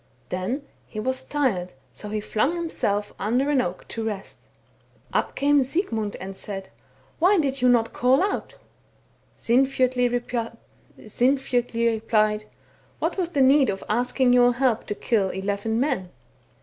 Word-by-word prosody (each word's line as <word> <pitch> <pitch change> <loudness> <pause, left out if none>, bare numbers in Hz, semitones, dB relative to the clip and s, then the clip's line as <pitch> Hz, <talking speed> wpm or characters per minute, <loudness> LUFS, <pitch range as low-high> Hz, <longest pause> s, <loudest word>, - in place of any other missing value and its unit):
Then 190 +11 -2 0.2
he 215 - -7
was 260 +4 -1
tii 290 +1 -1
ed, 180 0 -6 0.2
so 210 - -8
he 210 0 -2
flung 240 +10 0
himself 210 -12 -2
under 250 +7 +1
an 275 -3 +3
oak 180 -3 -5
to 225 - -4
rest. 210 -3 -5 0.7
Up - - 0
came 285 0 +3
Sigmund 245 - -2
and 190 +1 -7
said, 195 -1 -6 0.2
* - - -33
Why 375 +5 +5
did 275 -5 0
you 250 - +5
not 235 -2 +3
call 260 +7 +3
out? 400 - -2 0.4
' - - -37
Sinfjotli 255 0 +2 1.8
replied, 215 -1 +1 0.2
' - - -33
What - - -1
was 360 -3 -1
the 285 -5 0
need 270 +1 +5
of 195 -1 -3
asking 245 +3 +2
your 245 0 +5
help 255 -3 +1
to 205 - -2
kill 205 -3 +1
eleven 200 +4 -2
men 255 -10 -1
245 Hz, 150 wpm, -24 LUFS, 210-270 Hz, 1.8 s, Why